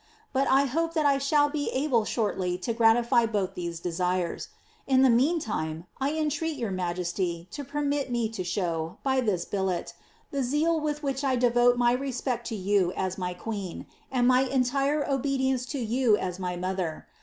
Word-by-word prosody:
But 270 +1 +2
I 275 +1 +4
hope 330 +5 -1
that 310 -2 +2
I 280 -1 +4
shall 290 +1 +3
be 290 0 -2
able 260 -5 +1
shortly 190 -6 -1
to 185 +6 -2
gratify 235 +1 +4
both 200 -4 -1
these 170 -2 -5
desires. 180 0 -1 0.4
In 265 -1 +4
the 260 - +6
meantime, 230 - 0
I 275 +2 0
entreat 315 0 -1
your 230 -6 -2
ma> 180 -2 -1
jesty 175 -1 -3
to 290 - -5
permit 285 0 -1
me 240 -2 0
to 220 -4 -4
show, 175 -1 -2
by 265 -1 +2
this 200 -8 0
billet, 190 -3 -2 0.4
the 280 - -1
zeal 300 +6 +1
with 300 0 -3
which 275 0 -2
I 265 -2 +2
devote 245 0 +4
my 240 0 +4
respect 250 -2 -2
to 225 - -3
you 195 -2 +1
as 190 0 -3
my 180 -1 -3
queen, 195 -2 -5 0.3
and 245 -2 +2
my 255 0 +5
entire 275 +3 +1
obedience 265 -2 0
to 285 - -4
you 235 -1 +2
as 180 -3 -3
to - - -10
my 180 -1 -2
mother. 180 -3 -3
240 Hz, 185 wpm, -27 LUFS, 185-275 Hz, 0.4 s, the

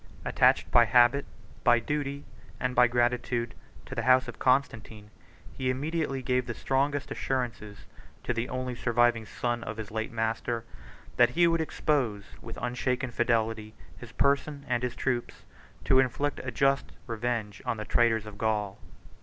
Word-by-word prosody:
73 - - -3
Attached - - +3
by 120 -1 +7
habit, 120 +5 +4 0.4
by 120 0 +6
duty, 140 +2 -3 0.3
and 125 0 -1
by 125 0 +6
gratitude, 120 0 0 0.3
to - - -9
the 115 - -1
house 130 +2 +4
of - - -8
Constantine, 110 -5 0 0.4
he 130 -1 -1
immediately 140 0 -2
gave 125 0 0
the 120 - -4
strongest 140 +1 -1
assurances 115 -6 -3 0.4
to - - -1
the 115 +1 -3
only 130 0 -3
surviving 120 -2 +1
son 120 +1 -2
of 105 +1 -6
his 110 -2 -6
late 110 0 -3
master, 115 +1 -2 0.5
that - - +6
he 175 +2 +3
would 165 -1 +2
expose, 135 -9 0 0.2
with - - -9
unshaken 125 +1 -2
fidelity, 115 -2 0 0.2
his 120 -2 -11
person 140 +1 0
and 120 -2 0
his 125 -1 -3
troops, 125 -3 -3 0.4
to 130 - +4
inflict 135 +2 0
a 130 - -3
just 135 +2 +1
revenge 115 -4 -3
on 115 - -2
the 110 - -5
traitors 115 -2 +2
of 105 -1 -10
Gaul. 105 -2 -1
120 Hz, 160 wpm, -28 LUFS, 115-130 Hz, 0.5 s, by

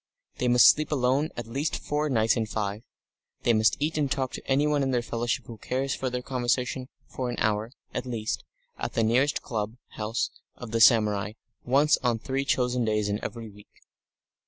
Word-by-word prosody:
They 125 - +1
must 125 0 +7
sleep 155 +1 +4
alone 135 +2 +2
at 120 - -4
least 135 +7 -2
four 150 +1 -1
nights 115 -3 +3
in 110 -2 -1
five; 105 -2 -2
and - - -36 0.6
they 120 - +4
must 110 0 +3
eat 155 +3 0
with - - -4
and 140 -2 0
talk 130 -2 -1
to - - -6
anyone 145 +2 +2
in 135 - +1
their 125 -2 +1
fellowship 120 0 -2
who 115 -2 -10
cares 135 +1 -1
for 130 - -2
their 125 0 -4
conversation 125 0 -1 0.2
for 125 -1 -4
an 120 - -3
hour, 110 +2 0 0.2
at 130 - -3
least, 110 -3 -3 0.4
at - - -3
the 115 - +1
nearest 130 +6 +2
club 110 0 -3
house 110 +2 -2 0.2
of 125 -3 -9
the 115 0 +1
samurai 105 -3 +4 0.3
once 140 +4 +4
on 120 -3 +1
three 135 +4 -2
chosen 125 -2 +1
days 105 -2 0
in 105 +1 -2
every 115 -1 -5
week. 105 0 -17
120 Hz, 200 wpm, -27 LUFS, 110-135 Hz, 0.6 s, must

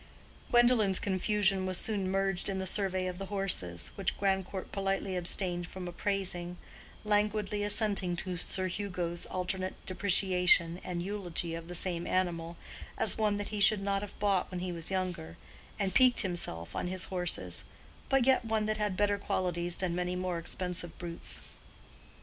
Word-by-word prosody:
Gwendolen's 240 -6 +5
confusion 195 -1 +2
was 185 -1 0
soon 200 -3 0
merged 195 0 0
in 195 - -1
the 190 - -2
survey 190 -1 +1
of 180 0 -4
the 195 - -5
horses, 180 - 0
which 195 -2 -2
Grandcourt 190 -1 -1
politely 195 -1 -1
abstained 175 0 -1
from 185 -1 -7
appraising, 180 -1 -2 0.5
languidly 210 0 +1
assenting 205 -4 +2
to 180 +1 -4
Sir 185 +2 -1
Hugo's 180 -2 -2
alternate 185 +1 -3
depreciation 180 -2 +3
and 175 -1 -3
eulogy 180 -4 -3
of 165 0 -6
the 175 - -5
same 175 -1 0
animal, 170 -2 -1 0.4
as - - +5
one 210 -2 +2
that 205 - -4
he 210 - -3
should 200 0 +5
not 195 0 0
have 205 - -8
bought 200 -3 +1
when 180 - -4
he 180 0 -2
was 165 -2 0
younger, 180 - -3 0.4
and 195 -2 -1
piqued 255 -1 +5
himself 130 - -3
on - - -1
his 185 0 -2
horses, 165 - -1 0.5
but 270 -2 +4
yet 265 -2 +4
one 220 -1 0
that 215 0 0
had 210 -3 -1
better 205 -1 +2
qualities 175 -1 -1
than 185 -2 -2
many 180 +1 -1
more 180 -1 -2
expensive 175 0 -3
brutes. 170 -1 -4
185 Hz, 160 wpm, -31 LUFS, 175-200 Hz, 0.5 s, Gwendolen's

